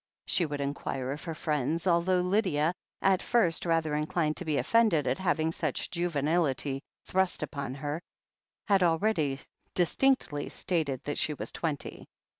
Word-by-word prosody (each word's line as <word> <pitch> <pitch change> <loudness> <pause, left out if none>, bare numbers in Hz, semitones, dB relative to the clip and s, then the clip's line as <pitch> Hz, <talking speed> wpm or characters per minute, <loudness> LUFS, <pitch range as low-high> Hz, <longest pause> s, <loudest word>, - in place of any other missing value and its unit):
she 170 - +2
would 145 -1 -4
inquire 135 -2 -3
of 145 - -5
her 165 -2 -4
friends, 155 +2 -1
although 180 +1 +3
Lydia, 180 -4 +2 0.3
at 190 -1 +4
first 180 -8 +2
rather 165 -2 +1
inclined 155 +1 0
to - - -5
be 155 -2 0
offended 215 - +3
at 130 +1 0
having 160 -3 +1
such 155 -4 -2
juvenility 150 -5 0 0.2
thrust 190 -1 +1
upon 135 -3 -4
her, 145 +3 -3 0.7
had 195 -2 +4
already 165 -5 +2 0.4
distinctly 175 - +1
stated 155 -7 -1
that 145 - -3
she 150 - 0
was - - -5
twenty. 155 -4 -4
160 Hz, 145 wpm, -29 LUFS, 145-180 Hz, 0.7 s, at